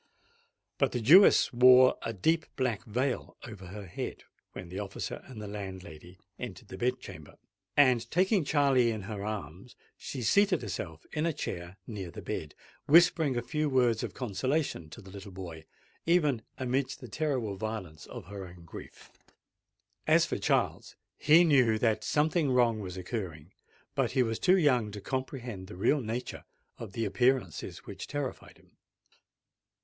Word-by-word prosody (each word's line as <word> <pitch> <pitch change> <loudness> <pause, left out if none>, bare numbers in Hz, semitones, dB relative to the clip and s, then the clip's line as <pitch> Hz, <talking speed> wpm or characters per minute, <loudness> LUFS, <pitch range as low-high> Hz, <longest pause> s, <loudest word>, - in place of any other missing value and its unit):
But - - +2
the 125 - 0
Jewess 160 - +7
wore 125 +1 +7
a - - -3
deep 160 - +1
black 125 -6 -1
veil 125 +4 -2
over 105 -5 -10
her 100 +2 -8
head, 85 - -6 0.3
when 85 - -8
the 95 - -5
officer 100 -1 -5
and 125 -4 -10
the 105 - -6
landlady 95 -4 -8 0.2
entered - - -8
the 95 - -8
bed 125 +3 0
chamber; - - -11 0.4
and, 125 -5 +4
taking 185 +2 +2
Charley 140 -5 +3
in 110 -3 -3
her 100 -1 -6
arms, 100 0 -6 0.2
she 130 -3 -5
seated 195 - +3
herself 80 -6 -6
in 155 +1 0
a 165 - 0
chair 90 -9 -6
near 100 -6 -6
the - - -9
bed, 75 -1 -5 0.3
whispering 160 -4 +5
a 120 - -1
few 150 +3 -1
words 125 -4 +2
of 110 -6 -5
consolation 130 - -2
to 120 - -11
the 95 - -12
little 100 0 -9
boy 85 -4 -8 0.4
even 150 -8 +3 0.2
amidst 130 +1 -1
the 125 - -9
terrible 125 -5 -2
violence 95 -7 -6
of 120 -7 -9
her 100 0 -8
own 85 -1 -14
grief. - - -12 1.0
As - - +5
for - - -3
Charles, - - 0 0.2
he 160 +4 +6
knew 130 -9 +4
that 110 -1 +1
something 155 0 +1
wrong 120 -3 +3
was 95 -3 -6
occurring; 90 -5 -5 0.4
but - - 0
he 130 -2 +3
was 115 -2 -2
too 185 +1 +4
young 130 - +3
to 105 - -6
comprehend 120 -4 -5
the 90 - -10
real 140 +9 +2
nature 120 +2 -5 0.4
of 105 -4 -8
the 115 +1 -1
appearances 115 - 0
which - - -8
terrified 145 -3 -5
him. - - -27
115 Hz, 165 wpm, -30 LUFS, 95-135 Hz, 1.0 s, Jewess